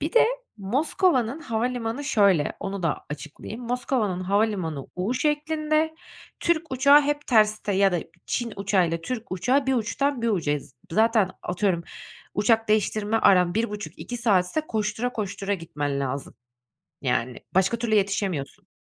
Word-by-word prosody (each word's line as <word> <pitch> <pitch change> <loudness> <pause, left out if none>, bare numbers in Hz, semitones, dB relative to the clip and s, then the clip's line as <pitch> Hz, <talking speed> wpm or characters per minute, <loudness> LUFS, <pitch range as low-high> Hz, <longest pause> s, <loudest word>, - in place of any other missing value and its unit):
Bir 305 +3 -2
de 475 - +6 0.3
Moskova'nın 260 - +1
havalimanı 240 0 -2
şöyle, 200 - +3
onu 195 -1 -4
da 165 - -1
açıklayayım. 155 +10 -7
Moskova'nın 235 -6 -1
havalimanı 185 -7 0
U 195 +7 -1
şeklinde. 310 +2 0 0.5
Türk 330 -4 0
uçağı 280 +3 +6
hep 290 0 -2
terste 215 -2 +3
ya 195 0 +3
da 175 - +1 0.3
Çin 240 -2 -2
uçağıyla 185 -4 +1
Türk 235 +3 -5
uçağı 255 +9 +1
bir 265 - +2
uçtan 250 +3 0
bir 235 - +2
ucayız. 150 - -1 0.2
Zaten 220 -1 +3
atıyorum, 180 -1 0 0.5
uçak 225 +2 +2
değiştirme 215 0 +1
aran 180 -5 +4
1,5-2 215 +2 -3
saatse 210 +2 +2
koştura 220 -2 -2
koştura 200 -1 -2
gitmen 145 -5 -3
lazım. 135 0 -4 0.7
Yani, 125 -2 -1 0.2
başka 190 +5 +3
türlü 225 -2 0
yetişemiyorsun. 195 -7 -1
215 Hz, 130 wpm, -25 LUFS, 185-250 Hz, 0.7 s, de